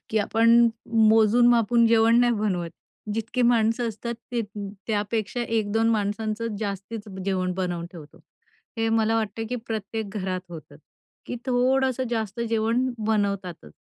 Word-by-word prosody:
की 220 - +1
आपण 225 +2 +2 0.6
मोजून-मापून 230 +1 +4
जेवण 230 +1 +4
नाही 240 -1 +3
बनवत. 190 -6 -1 0.4
जितकी 225 +3 -2
माणसं 235 0 +2
असतात 235 +2 -5 0.2
ते 240 - 0 0.5
त्यापेक्षा 215 +2 -2
1-2 225 -1 0
माणसांचं 215 +1 -2
जास्तीच 205 +1 -5 0.2
जेवण 185 -2 0
बनवून 175 -2 -3
ठेवतो. 155 -4 -12 0.6
हे 225 0 0
मला 225 0 +2
वाटतं 225 0 -2
की 250 - -2
प्रत्येक 220 0 -4
घरात 185 -2 -2
होतं 165 -2 -10 0.5
की 245 - -4
थोडंसं 260 +1 +1
जास्त 220 -1 -3
जेवण 230 +3 +1 0.2
बनवतातच. 200 - -2
220 Hz, 125 wpm, -25 LUFS, 205-230 Hz, 0.6 s, मोजून-मापून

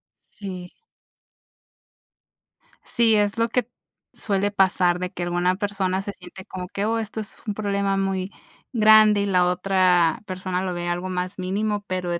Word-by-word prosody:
Sí. 185 -4 -9 2.1
Sí, 230 -2 +3
es 205 +1 +1
lo 230 0 +1
que 245 -1 0 0.5
suele 200 0 -1
pasar, 180 -3 +2
de 180 0 -3
que 175 - -5
alguna 175 +1 +1
persona 195 -2 -1
se 200 +1 -6
siente 185 +1 -12
como 180 -1 -7
que 200 +2 -3
"Oh, 225 +1 0
esto 220 0 -4
es 215 - -6
un 210 - -1
problema 200 -1 -1
muy 195 0 -2 0.4
grande", 215 -2 +6
y - - 0
la 180 -3 +3
otra 180 -2 +2
persona 185 -1 -3
lo 185 -1 -2
ve 175 0 -4
algo 175 +2 -2
más 180 +1 -3
mínimo, 205 +3 -1
pero 185 -1 -3
de 170 - -2
190 Hz, 160 wpm, -23 LUFS, 180-205 Hz, 2.1 s, grande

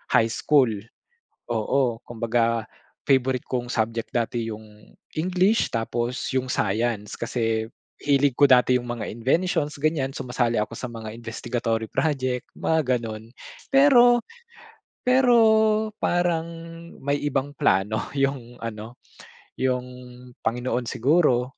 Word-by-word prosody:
high 115 0 +4
school 135 +1 +3 0.8
oo, 120 +1 0
kumbaga 115 -1 -1 0.4
favorite 130 -2 +2
kong 125 -1 -3
subject 115 0 -1
dati 115 -1 -1
yung 105 -1 -12 0.2
English, 185 +6 +2
tapos 120 +3 -2
yung 130 0 -1
Science, 105 -1 -1
kasi 115 -1 -2 0.3
hilig 140 -2 +3
ko 145 - +5
dati 125 0 +5
yung 120 -1 -4
mga 120 -2 -4
inventions 145 +4 0
ganyan, 145 -3 0
sumasali 125 -3 -1
ako 105 +1 -2
sa 125 - -6
mga 110 -2 -7
investigatory 115 0 -3
project, 130 -2 -1
mga 140 -6 +1
ganon. 110 -1 -7 0.4
Pero 250 -3 +6 0.8
pero 250 -1 +4 0.6
parang 175 -2 +1 0.6
may 140 +1 0
ibang 140 -1 0
plano 100 +4 +1
yung 135 -3 -2
ano, 115 +1 -7 0.6
yung 125 -1 +1 0.6
Panginoon 120 +1 -2
siguro. 130 -2 +2
125 Hz, 110 wpm, -24 LUFS, 115-140 Hz, 0.8 s, Pero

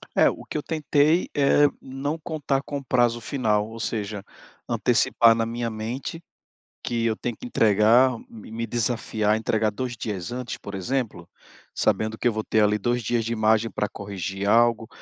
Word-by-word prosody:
É, - - +5
o - - -7
que - - -9
eu 150 - 0
tentei 155 +1 +2
é 145 +1 +4 0.2
não 140 +4 -4
contar 145 -4 -2
com 140 -1 -5
prazo 120 -2 +2
final, 110 -5 0
ou 115 +1 -9
seja, 105 -2 -3 0.5
antecipar 115 -1 +4
na 115 - 0
minha 115 0 -3
mente 120 +9 -5 0.6
que 115 -1 -1
eu 110 -1 +1
tenho 120 0 -4
que - - -8
entregar 115 +4 +4 0.2
me 110 -1 -12
me 115 +1 -4
desafiar, 110 -2 0
entregar 110 -1 0
2 125 +2 -4
dias 105 -1 -4
antes, 125 -1 -5
por 100 - -8
exemplo, 95 -3 -3 0.5
sabendo 110 0 0
que - - 0
eu 120 - +2
vou 110 - -2
ter 110 - +2
ali 105 0 +3
2 120 +4 0
dias 115 +1 0
de 115 +1 -2
margem 110 +1 +2
para 105 - -1
corrigir 100 -1 -5
algo, 115 0 +3
115 Hz, 175 wpm, -24 LUFS, 110-125 Hz, 0.6 s, É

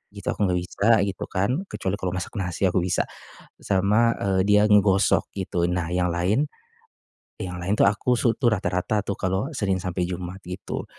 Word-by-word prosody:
gitu 100 - -5
aku 105 - 0
enggak 90 0 +1
bisa 100 +5 -1 0.2
gitu - - -6
kan. 100 +5 0 0.2
Kecuali 95 +1 -2
kalau 90 -1 -2
masak 90 - -4
nasi 90 0 -3
aku 90 0 +1
bisa 90 0 +1 0.6
sama, 105 +4 +2
eee, 95 -1 +1
dia 105 0 +5
ngegosok 100 -2 +3
gitu. 90 -3 -1
Nah 85 -2 -1
yang 90 -1 +1
lain 95 +11 +1 1.0
yang 90 -1 -5
lain 95 +4 0
itu - - +4
aku 115 +5 +1
su 115 -1 +2
tuh 125 - +1
rata-rata 95 +2 -1
tuh 100 - -3
kalau 95 +2 -1
Senin 95 -3 0
sampai 90 -1 -1
Jumat 90 +1 -5
gitu. 90 +1 -5
95 Hz, 180 wpm, -24 LUFS, 90-100 Hz, 1.0 s, dia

